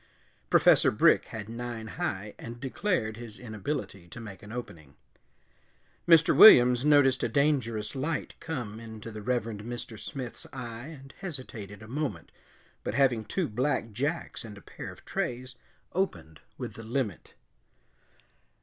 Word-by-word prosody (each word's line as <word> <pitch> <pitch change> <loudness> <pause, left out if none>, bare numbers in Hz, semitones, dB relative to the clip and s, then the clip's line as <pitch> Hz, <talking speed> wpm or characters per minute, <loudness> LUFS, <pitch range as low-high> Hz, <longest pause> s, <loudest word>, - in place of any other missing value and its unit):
Professor - - +6
Brick - - +4
had 105 -2 -7
nine 115 -1 -5
high 105 - -3
and 120 +1 -8
declared 135 - -1
his 115 -3 -8
inability 110 - -5
to 85 - -10
make 105 -4 -9
an 105 - -11
opening. 80 - -8 1.1
Mr. 165 -1 +6
Williams 125 - +9
noticed 145 -3 +5
a - - 0
dangerous 125 -5 +1
light 150 +5 -2
come 120 -9 -5
into 110 0 -9
the 110 -1 -7
Reverend 115 -2 -1
Mr. 120 -1 -6
Smith's 130 0 -6
eye 120 -1 -7
and 135 -4 -11
hesitated 125 - -7
a - - -11
moment, 125 - -4 0.5
but - - -3
having 125 -5 +3
two 175 - -1
black 120 0 -1
jacks 145 +10 -2
and 105 -3 -9
a - - -12
pair - - -8
of - - -16
trays, 125 +1 -3 0.4
opened 85 - -2 0.2
with - - -5
the 115 - -9
limit. 115 -1 -3
120 Hz, 140 wpm, -29 LUFS, 110-135 Hz, 1.1 s, Williams